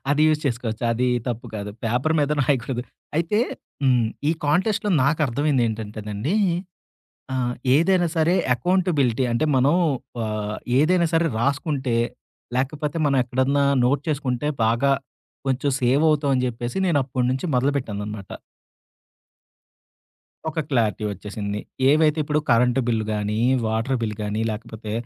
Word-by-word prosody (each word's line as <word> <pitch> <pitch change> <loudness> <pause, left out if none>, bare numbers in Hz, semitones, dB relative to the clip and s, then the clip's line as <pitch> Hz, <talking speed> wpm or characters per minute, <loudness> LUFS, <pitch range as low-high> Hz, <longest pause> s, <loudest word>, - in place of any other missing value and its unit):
అది 145 +1 +3
యూజ్ 155 -1 +2
చేసుకోవచ్చు. 115 -3 -3
అది 125 +2 +1 0.2
తప్పు 120 +1 -4
కాదు. 105 -1 -4
పేపరు 125 +7 +1
మీద 145 0 +1
రాయకూడదు. 130 -2 0 0.3
అయితే 170 +6 +1 0.4
హ్మ్. 125 -4 +3 0.2
ఈ - - +4
కాంటెస్ట్‌‌లో 190 +7 +1
నాకర్థమైందేంటంటేనండి, 120 - 0 1.0
ఆహ్, 125 -2 -1 0.2
ఏదైనా 175 +2 +3
సరే 165 +2 +3 0.2
ఎకౌంటబిలిటీ. 140 -5 +1
అంటే, 120 +6 +1
మనం 135 +5 +4 0.5
ఆహ్, 105 0 -3 0.2
ఏదైనా 170 +3 +3
సరే 165 +1 +3
రాసుకుంటే. 135 -1 0 0.6
లేకపోతే 145 +4 -2
మనం 140 -1 +2
ఎక్కడన్నా 130 +3 +1 0.2
నోట్ 140 +3 +2
చేసుకుంటే 140 -2 -1 0.2
బాగా 120 +5 +2 0.6
కొంచెం 135 +2 +1
సేవవుతాం 145 +3 +3
అని 125 - +1
జెప్పేసి 120 +2 -4
నేను 160 -5 +3
అప్పటి 130 -1 -1
నుంచి 130 +7 -2
మొదలుపెట్టాననమాట. 110 -7 -2 2.2
ఒక 160 +1 -2
క్లారిటీ 110 -6 0
ఒచ్చేసింది. 100 +1 -5 0.3
ఏవైతే 155 +1 +3
ఇప్పుడు 150 +1 +1
కరెంటు 125 +2 +4
బిల్లు 110 -2 +1
గానీ, 105 0 -1 0.3
వాటర్ 115 +4 0
బిల్ 105 -2 -2
కానీ, 105 +1 -2
లేకపోతే 110 -1 -7
130 Hz, 120 wpm, -23 LUFS, 115-150 Hz, 2.2 s, ఈ